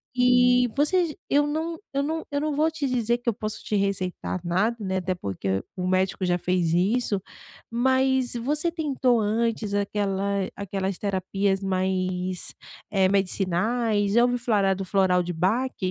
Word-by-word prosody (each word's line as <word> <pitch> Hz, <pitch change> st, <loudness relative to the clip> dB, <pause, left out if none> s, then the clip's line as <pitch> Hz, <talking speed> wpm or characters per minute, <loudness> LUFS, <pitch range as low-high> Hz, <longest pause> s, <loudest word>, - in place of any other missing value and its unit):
E, 250 Hz, 0 st, +5 dB
você 345 Hz, +5 st, +3 dB
j 300 Hz, -, -9 dB
eu 290 Hz, +1 st, +3 dB
não 320 Hz, +3 st, -2 dB, 0.2 s
eu 275 Hz, 0 st, +1 dB
não 320 Hz, +2 st, -3 dB
eu 285 Hz, 0 st, -1 dB
não 305 Hz, 0 st, -1 dB
vou 310 Hz, +2 st, +3 dB
te 315 Hz, -3 st, -3 dB
dizer 240 Hz, -2 st, 0 dB
que 240 Hz, -, -1 dB
eu -, -, 0 dB
posso 215 Hz, 0 st, -5 dB
te 215 Hz, -, -2 dB
receitar 190 Hz, -2 st, -2 dB
nada, 190 Hz, +7 st, +1 dB
né, 190 Hz, -2 st, -1 dB
até 185 Hz, 0 st, -1 dB
porque 95 Hz, -, -3 dB
o 180 Hz, 0 st, -2 dB
médico 185 Hz, +1 st, +1 dB
já 175 Hz, -1 st, +2 dB
fez 180 Hz, -2 st, 0 dB
isso. 200 Hz, +3 st, +1 dB, 0.5 s
Mas, 260 Hz, +1 st, +2 dB
você 295 Hz, +8 st, 0 dB
tentou 270 Hz, -7 st, +1 dB
antes 220 Hz, 0 st, 0 dB
aquela 200 Hz, -1 st, -1 dB
aquelas 195 Hz, -1 st, -3 dB
terapias 195 Hz, 0 st, -1 dB
mais, 185 Hz, -1 st, -1 dB, 0.4 s
eh, 190 Hz, -2 st, +3 dB
medicinais? 200 Hz, +3 st, +1 dB
Já 235 Hz, +2 st, +5 dB
ouviu 245 Hz, 0 st, +1 dB
falar 205 Hz, -5 st, +2 dB
do 195 Hz, -, -4 dB
floral 185 Hz, -2 st, +2 dB
de 175 Hz, -, -4 dB
Bach? 215 Hz, +10 st, 0 dB
205 Hz, 160 wpm, -25 LUFS, 185-250 Hz, 0.5 s, E